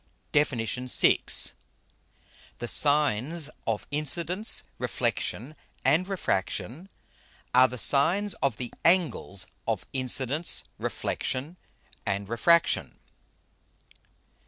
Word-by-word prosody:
_ - - -42
DEFIN. 145 -3 +1
VI. 125 +3 +1 1.4
_The 120 - -5
Sines 145 +2 +2 0.2
of 110 -2 -2
Incidence, 170 +7 +2 0.2
Reflexion, 135 +8 -3 0.3
and 180 +4 +2
Refraction, 135 - -4 0.6
are 130 +1 +6
the 125 - -8
Sines 170 - +3
of 135 -5 -1
the 125 -2 -7
Angles 150 - +1 0.2
of 110 -5 -2
Incidence, 135 +4 +2 0.2
Reflexion, 140 +7 -4 0.5
and 100 0 -3
Refraction. 170 +9 +1
140 Hz, 85 wpm, -26 LUFS, 120-165 Hz, 1.4 s, are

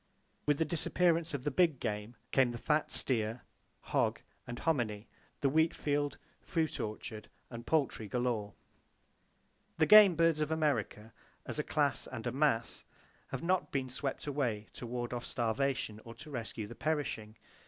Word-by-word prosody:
With 145 -1 +4
the 160 - +2
disappearance 170 0 +1
of 130 - -5
the 145 - 0
big 160 -2 +3
game 105 +2 -3 0.2
came 130 -2 +4
the 120 - -4
fat 150 +5 +1
steer, 115 -2 0 0.4
hog - - +1 0.3
and 120 -1 -5
hominy, 120 -10 0 0.3
the 140 - +3
wheat 160 +3 +3
field, 145 -1 -1 0.2
fruit 160 -3 -1
orchard 110 0 -5 0.2
and 115 -1 -8
poultry 135 -8 +1
galore. 115 -3 -1 1.2
The 160 - +4
game 205 +1 +9
birds 165 -1 +3
of 150 - 0
America, 130 -8 -1 0.3
as - - -3
a - - +1
class - - +1
and - - -7
a - - 0
mass, - - +1 0.4
have - - -5
not 175 -4 +1
been 130 -2 -2
swept 135 +1 -3
away 125 -8 -1
to 120 - -7
ward 120 0 -3
off 120 -1 -3
starvation 120 -2 -1
or 115 0 -10
to 150 +6 -11
rescue 115 -4 -4
the 105 - -9
perishing. 120 -7 -2
130 Hz, 160 wpm, -33 LUFS, 115-155 Hz, 1.2 s, game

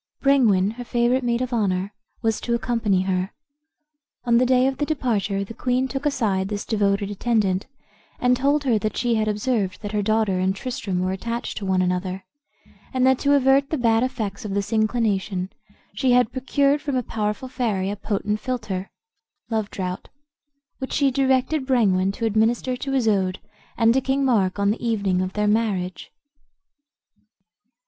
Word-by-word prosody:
Brengwain, 220 -9 +4
her 245 - -5
favorite 240 +2 +1
maid 240 +1 0
of 250 0 -4
honor, 195 -3 0 0.3
was 225 -1 0
to 235 - 0
accompany 225 -6 0
her. 185 0 -1 1.0
On 235 -1 +4
the 250 - +3
day 255 0 +4
of 265 -1 0
departure 230 -10 0
the 200 - -9
queen 255 +2 0
took 270 +2 -2
aside 205 -9 0
this 205 0 -4
devoted 200 -2 0
attendant, 205 -3 0 0.5
and 250 0 +3
told 280 +3 +1
her 240 -6 +2
that 215 0 -3
she 240 0 +1
had 215 -1 +1
observed 210 -2 -1
that 205 - -4
her 210 -1 0
daughter 215 -2 +1
and 190 +1 +1
Tristram 195 -6 -3
were 185 0 0
attached 230 +5 -4
to 200 - -5
one 185 -1 +2
another, 185 +1 -2 0.7
and 255 -1 +1
that 265 -1 +4
to 285 0 +3
avert 275 +1 +3
the 315 - -1
bad 230 -3 +3
effects 230 -6 -3
of 200 -2 -4
this 200 +2 -2
inclination 215 -4 0 0.4
she 245 +5 +2
had 245 -1 +3
procured 275 +3 +1
from 285 -2 -2
a 250 - 0
powerful 215 +4 -3
fairy 215 -7 -1
a - - -3
potent 210 0 -2
philter 215 -7 -3 0.6
(love 220 -2 -1
draught), 185 -1 -5 0.7
which 265 - -5
she 280 -2 +3
directed 265 +2 +1
Brengwain 195 -7 +3
to 230 - -3
administer 225 +4 +1
to 270 +2 -4
Isoude 200 -7 +1 0.4
and 230 -1 +4
to 265 - +2
King 270 +1 0
Mark 205 -8 +2
on 200 0 +2
the 225 - -5
evening 200 -6 +1
of 185 0 -3
their 210 0 0
marriage. 205 -4 -1
225 Hz, 170 wpm, -23 LUFS, 195-255 Hz, 1.0 s, Brengwain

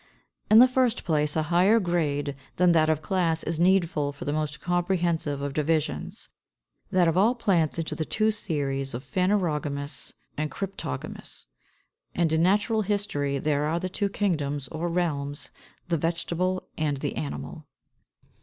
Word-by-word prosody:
In 215 - +7
the 250 +3 +9
first 255 -2 +1
place, 150 -3 +1
a 160 - +2
higher 195 +6 +5
grade 150 -6 -1 0.2
than 180 0 +4
that 160 -2 +4
of 155 -1 +1
class 170 -4 +1
is 165 -1 -2
needful 170 -5 +2
for 145 - -9
the 145 - -1
most 150 -1 -2
comprehensive 170 -4 0
of 140 -1 -3
divisions, 155 +1 -1 0.6
that 180 -2 +3
of 165 +2 +2
all 225 +6 +4
plants 175 -10 +1
into 165 -1 -2
the 160 - -2
two 215 +6 +1
Series 135 - -2
of 125 - -5
Phanerogamous 150 -5 -1 0.2
and 155 0 -2
Cryptogamous 190 - -5
(6); - - -34 0.7
and 165 -2 +2
in 160 - +3
natural 210 +5 +3
history 195 -9 -1
there 145 +1 0
are 160 +3 0
the 185 - -3
two 200 +2 -1
Kingdoms 145 -9 -1
or 165 +2 -3
Realms, 145 -5 -2 0.4
the 170 -1 +1
Vegetable 170 +3 -1 0.2
and 150 -2 0
the - - -3
Animal. 75 -2 -5
165 Hz, 155 wpm, -26 LUFS, 145-185 Hz, 0.7 s, the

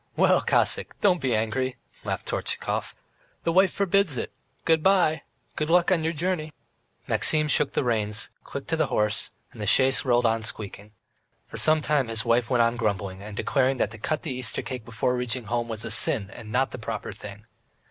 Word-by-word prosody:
"Well, - - +3
Cossack, - - +3
don't 180 -4 +2
be 130 -4 0
angry," 120 +4 -1 0.3
laughed - - -4
Tortchakov. - - -2 0.5
"The 165 - 0
wife 190 +2 +4
forbids 200 -6 +2
it! - - -4 0.3
Good 160 -1 +3
bye. 180 -4 +3 0.3
Good 155 0 -2
luck 175 +2 +3
on 170 -4 +2
your 160 - 0
journey!" 160 -1 -3 0.5
Maxim 155 -1 +2
shook 150 -1 +2
the - - 0
reins, 110 -3 0
clicked - - -8
to - - 0
his - - +1
horse, 105 -1 -1 0.2
and - - -11
the 105 - -3
chaise 130 +5 +5
rolled 120 -2 +2
on 115 0 +1
squeaking. 105 -1 -7 0.5
For - - -10
some 155 0 +3
time 145 -3 +1
his 115 -2 0
wife 115 0 +1
went 125 -3 +3
on 115 +1 0
grumbling, 100 -4 -2
and 105 0 -9
declaring 135 -1 +1
that 110 - -1
to 115 - -10
cut 155 +7 -2
the 150 - -3
Easter 125 -2 -3
cake 125 -4 -6
before 115 +2 -1
reaching 125 0 -2
home 120 +2 -2
was 110 -2 -5
a - - -4
sin 100 -3 +4
and 110 +1 -10
not 130 +3 +1
the - - -7
proper 110 -1 -5
thing. 105 +1 -10
125 Hz, 200 wpm, -25 LUFS, 110-155 Hz, 0.5 s, chaise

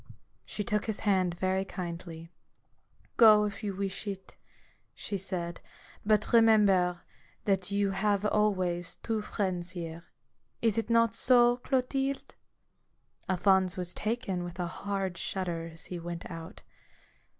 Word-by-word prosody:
She 210 - -3
took 210 +1 -1
his 220 -2 -2
hand 185 -4 +2
very 190 +1 0
kindly. 170 -3 -7 0.4
" - - -37
Go, 210 -1 +8
if 205 -1 -5
you 200 -2 -2
wish 195 +2 -3
it," 195 -1 -6 0.6
she 205 - -5
said; 175 -3 -3 0.2
" - - -23
but 215 +2 +2
remember 200 -6 +5 0.4
that 190 -2 +1
you 200 0 +1
have 200 +1 +1
always 185 -5 0
two 225 -2 -1
friends 185 -4 -2
here. 165 0 -6 0.5
Is 225 -1 +2
it 225 - -4
not 230 -1 +4
so, 240 0 +4
Clotilde? 270 +2 -1 0.5
" - - -34
Alphonse 190 0 +3
was 180 -1 -3
taken 215 -5 -2
with 175 0 -7
a 175 - 0
hard 190 0 -3
shudder 170 -3 -3
as 165 +2 -8
he 180 - -6
went 170 0 -6
out. 165 -1 -9
195 Hz, 140 wpm, -30 LUFS, 175-210 Hz, 0.6 s, Go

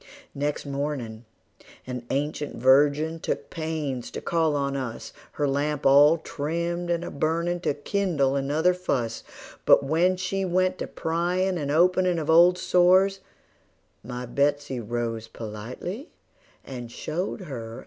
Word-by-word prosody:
Next 145 +1 -2
mornin' 135 -5 -4 0.6
an 125 -1 -6
ancient 145 +1 -2
virgin 145 +6 +3
took - - -4
pains 155 -6 -3
to - - -6
call 160 -3 +1
on 140 -1 -1
us, 130 -4 -5 0.2
Her 145 - 0
lamp 145 +1 -1
all 145 +4 +7
trimmed 170 +3 -3
and 170 0 0
a - - -6
burnin' 170 +4 -1
to 150 - -1
kindle 145 -5 0
another 150 +6 +2
fuss; 125 -10 -2 0.4
But - - +6
when 170 +6 +2
she 190 +1 -2
went 185 0 +1
to - - -3
pryin' 175 +3 -1
and 145 -2 -3
openin' 180 +3 +3
of 160 0 0
old 175 +2 +6
sores, 185 +2 +4 0.8
My 125 +2 -6
Betsey 140 +1 0
rose 115 0 -3
politely, 120 - -7 0.6
and 120 -3 -7
showed 170 +10 -4
her 150 -7 -7
out - - -5
of 115 - -8
doors. 120 - -8
150 Hz, 145 wpm, -25 LUFS, 135-175 Hz, 0.8 s, all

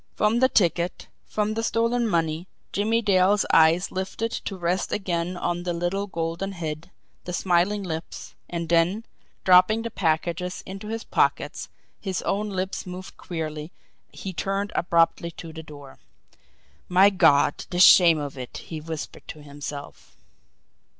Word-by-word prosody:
From 215 +3 +2
the 260 +1 +4
ticket, 175 -4 +1 0.2
from 215 0 -1
the 225 - -2
stolen 230 +1 +1
money, 165 -2 -1 0.2
Jimmie 225 +3 +1
Dale's 195 0 +3
eyes 165 +3 +5
lifted 190 +5 -3
to 195 - -5
rest 175 +1 -1
again 180 -2 -2
on 175 0 -2
the 175 0 -2
little 175 +4 -2
golden 170 +2 -3
head, 160 -1 -5 0.4
the 180 - -5
smiling 185 +3 +1
lips 165 -2 -6 0.2
and 170 -1 -3
then, 175 +7 +2 0.4
dropping 185 +5 +5
the 230 - -4
packages 170 +1 -1
into 195 +2 -8
his 225 +1 -4
pockets, - - 0 0.3
his 190 -4 -3
own 210 +1 -1
lips 190 -1 -3
moving 180 +1 -8
queerly, 155 -2 -5 0.4
he 190 - -7
turned 195 +4 -2
abruptly 170 0 +2
to 165 -1 -8
the 160 - -7
door. 145 -3 -13 0.9
"My 190 +3 +6
God, 145 -6 +4
the 175 - -4
shame 175 -2 +8
of 145 -2 -5
it!" 125 - -7
he 160 -2 -7
whispered 160 -1 -7
to 150 - -9
himself. 145 0 -9
180 Hz, 145 wpm, -25 LUFS, 165-200 Hz, 0.9 s, shame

